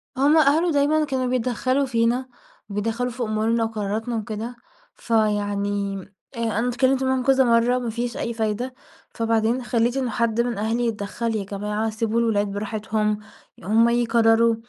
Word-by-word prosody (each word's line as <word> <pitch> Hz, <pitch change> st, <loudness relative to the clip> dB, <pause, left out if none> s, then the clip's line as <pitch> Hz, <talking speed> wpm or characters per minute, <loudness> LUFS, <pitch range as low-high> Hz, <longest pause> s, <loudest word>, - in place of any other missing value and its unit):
هُم 285 Hz, +4 st, +4 dB
أهله 315 Hz, +3 st, +4 dB
دايمًا 290 Hz, +1 st, +2 dB
اللي 310 Hz, -1 st, +2 dB
كانوا 265 Hz, -3 st, -1 dB
بيتدخلوا 255 Hz, +2 st, 0 dB
فينا، 240 Hz, +1 st, 0 dB, 0.4 s
بيتدخلوا 225 Hz, +5 st, -2 dB
في 245 Hz, +1 st, -4 dB
أمورنا 225 Hz, +1 st, 0 dB
وقراراتنا 220 Hz, +1 st, -2 dB
وكده، 220 Hz, +2 st, -4 dB, 0.4 s
فيعني 205 Hz, -2 st, 0 dB, 0.4 s
آآ 230 Hz, -2 st, -1 dB
أنا 240 Hz, -, 0 dB
اتكلمت 260 Hz, +2 st, +2 dB
معاهم 260 Hz, -1 st, +1 dB
كذا 270 Hz, 0 st, +4 dB
مرّة، 235 Hz, +1 st, +3 dB
ما 245 Hz, -2 st, -3 dB
فيش 235 Hz, +1 st, -3 dB
أي 235 Hz, -, -2 dB
فايدة، 225 Hz, +3 st, -2 dB, 0.4 s
فبعدين 230 Hz, +2 st, 0 dB
خلّيت 235 Hz, +2 st, +1 dB
إنه 260 Hz, -2 st, -1 dB
حد 230 Hz, +1 st, +1 dB
من 240 Hz, -2 st, -2 dB
أهلي 225 Hz, +3 st, 0 dB
يتدخل، 225 Hz, +1 st, -3 dB
"يا 210 Hz, -, -1 dB
جماعة 210 Hz, +2 st, -3 dB
سيبوا 225 Hz, +1 st, -1 dB
الولاد 215 Hz, -3 st, +1 dB
براحتهم 210 Hz, +1 st, -1 dB, 0.4 s
هُم 225 Hz, +5 st, +4 dB
يقرروا،" 230 Hz, -1 st, +3 dB
230 Hz, 150 wpm, -23 LUFS, 215-245 Hz, 0.4 s, هُم